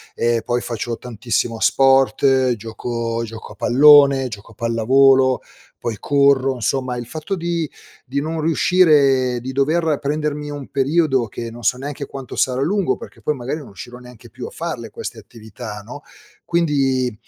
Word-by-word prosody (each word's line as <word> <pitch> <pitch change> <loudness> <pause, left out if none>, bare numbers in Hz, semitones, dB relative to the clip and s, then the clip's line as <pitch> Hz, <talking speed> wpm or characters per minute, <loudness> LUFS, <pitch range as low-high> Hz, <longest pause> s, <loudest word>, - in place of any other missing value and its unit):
ehm, 120 -1 +1
poi 120 +1 -1
faccio 115 0 -4
tantissimo 115 -1 -3
sport, 135 -1 +3
gioco 115 +1 -4
gioco 110 -1 -10
a - - -20
pallone, 140 +2 +6
gioco 105 0 -10
a - - -26
pallavolo, 130 +3 +3 0.4
poi 115 -3 -4
corro; 140 -2 +3
insomma, 130 +1 -2
il 120 - -5
fatto 155 +8 -4
di 170 -3 -2 0.4
di 135 +3 -2
non 160 +2 -3
riuscire 145 -6 +3
di 130 +2 -5
dover 155 +3 +1
prendermi 150 0 -2
un 145 -2 -7
periodo 140 -2 +1
che 115 +2 -7
non 120 +1 -11
so 120 +4 +2
neanche 140 +2 -6
quanto 135 -2 -9
sarà 130 0 0
lungo 195 +6 +1
perché - - -12
poi 150 - -1
magari 130 +3 -4
non 145 -5 -10
riuscirò 115 +4 -10
neanche 125 -2 -14
più - - -8
a - - -8
farle - - -5
queste - - -7
attività, 110 -2 -10
no, 145 +6 -9 0.4
quindi 135 -8 +1
130 Hz, 160 wpm, -20 LUFS, 120-145 Hz, 0.4 s, pallone